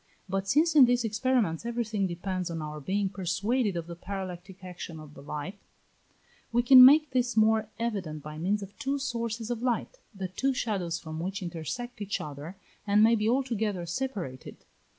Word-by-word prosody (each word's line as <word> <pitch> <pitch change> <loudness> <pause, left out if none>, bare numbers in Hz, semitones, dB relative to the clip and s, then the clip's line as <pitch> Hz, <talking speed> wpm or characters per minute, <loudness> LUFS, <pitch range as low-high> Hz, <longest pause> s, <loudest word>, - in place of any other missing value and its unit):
But 195 +1 -2
since 310 +9 +3
in 280 -4 +9
these 245 0 +2
experiments 225 -5 0
everything 230 -4 -1
depends 180 +1 -3
on 165 -1 -4
our 150 -1 -5
being 195 +7 -1
persuaded 200 +3 -1
of 170 - -4
the 170 0 -8
parallactic 185 0 -7
action 180 -3 -8
of 155 -1 -12
the 140 - -12
light, 150 +7 -6 0.9
we 240 +1 +2
can 255 +1 +10
make 295 +3 +7
this 245 -2 0
more 220 0 +3
evident 195 -10 -3
by 150 0 -8
means 200 +5 0
of 195 +1 -11
two 280 -1 -1
sources 235 -4 -3
of 235 -1 -3
light, 250 - -1 0.2
the 190 -1 -4
two 265 +9 -1
shadows 185 -9 -1
from 160 -1 -7
which 190 +3 -4
intersect 180 - -5
each 205 0 -2
other, 150 +5 -7 0.3
and 205 +1 +5
may 225 +1 +6
be 215 -1 +1
altogether 220 -8 0
separated. 175 - -5
200 Hz, 175 wpm, -28 LUFS, 175-240 Hz, 0.9 s, can